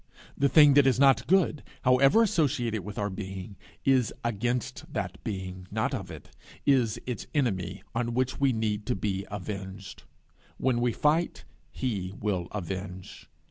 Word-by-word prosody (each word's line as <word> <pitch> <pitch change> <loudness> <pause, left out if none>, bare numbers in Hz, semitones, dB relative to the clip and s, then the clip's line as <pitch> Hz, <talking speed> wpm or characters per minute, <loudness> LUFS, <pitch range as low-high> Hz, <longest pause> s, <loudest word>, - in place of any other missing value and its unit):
The 140 - +2
thing 150 -2 +7
that 140 -1 +6
is 130 -1 +3
not 135 -1 +5
good, 175 -5 +3 0.2
however 135 - +5
associated 120 - 0
with 105 +3 -8
our 105 -2 -1
being, 95 0 -6 0.3
is 130 -4 +3
against 120 +1 -2
that - - -4
being, 95 -2 -5
not - - -1
of - - -4
it - - -11 0.3
is 125 -6 +3
its 125 -2 -4
enemy, 95 - -1
on 115 0 -1
which 130 0 0
we 140 -1 +4
need 110 -2 -2
to - - +1
be 95 0 -2
avenged. 95 -1 -7 0.6
When 125 -2 +1
we 120 0 +2
fight, 155 +8 +1 0.2
he 95 -1 -3
will 95 -5 -1
avenge. 95 -1 -6
110 Hz, 150 wpm, -28 LUFS, 95-130 Hz, 0.6 s, thing